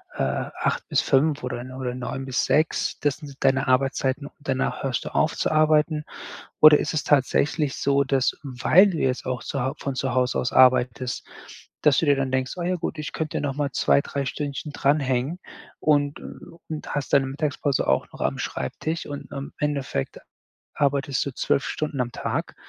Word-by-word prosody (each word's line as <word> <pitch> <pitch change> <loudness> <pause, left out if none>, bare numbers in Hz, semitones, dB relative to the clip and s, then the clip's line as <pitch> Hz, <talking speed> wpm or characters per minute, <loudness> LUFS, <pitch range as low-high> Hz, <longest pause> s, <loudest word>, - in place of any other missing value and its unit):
äh, - - -1
8 65 - -2
bis - - +3
5 145 +1 +2
oder 125 -1 -3 0.2
oder 125 -1 -3
9 135 +1 -5
bis 130 -2 0
6, 155 +1 +1
das 145 -1 0
sind 145 -3 -10
deine 135 +1 +3
Arbeitszeiten 135 +1 +1
und - - -17
danach 135 -1 -2
hörst 130 -2 -2
du - - -3
auf 155 - +2
zu - - 0
arbeiten?“ 155 0 +3 0.6
Oder 155 -1 +9
ist 150 - -2
es 150 - 0
tatsächlich 145 +1 +2
so, 140 0 +2
dass, 135 -2 +1
weil 145 +9 +4
du 170 - -3
jetzt 130 -1 0
auch 125 -1 -3
zuhau 135 +1 -2
von 140 - -3
zu 130 -1 -1
Hause 125 0 +1
aus 125 - -1
arbeitest, 125 -1 +3 0.6
dass 150 -3 +5
du 165 - 0
dir 140 - +5
dann 135 -1 -1
denkst: 130 0 -1
„Ah 175 - -3
ja, 180 0 +1
gut, 170 -1 -4
ich 150 - -4
könnte 155 -2 -3
nochmal 145 0 -2
2, 140 - +3
3 140 -1 -4
Stündchen 145 +2 -4
dranhängen“ 140 +2 0 0.4
und, 145 -1 +2
äh - - -13 0.5
und 155 -1 -5
hast 145 - -3
deine 135 -1 +4
Mittagspause 145 -1 -1
auch - - +1
noch - - -10
am - - -1
Schreibtisch 160 - -3
und 145 0 -7
im 140 -1 -6
Endeffekt 140 - -2 0.6
arbeitest 140 -1 0
du 140 - -3
12 135 - 0
Stunden 150 -3 -3
am 120 -1 -5
Tag - - -3
140 Hz, 185 wpm, -24 LUFS, 130-150 Hz, 0.6 s, Oder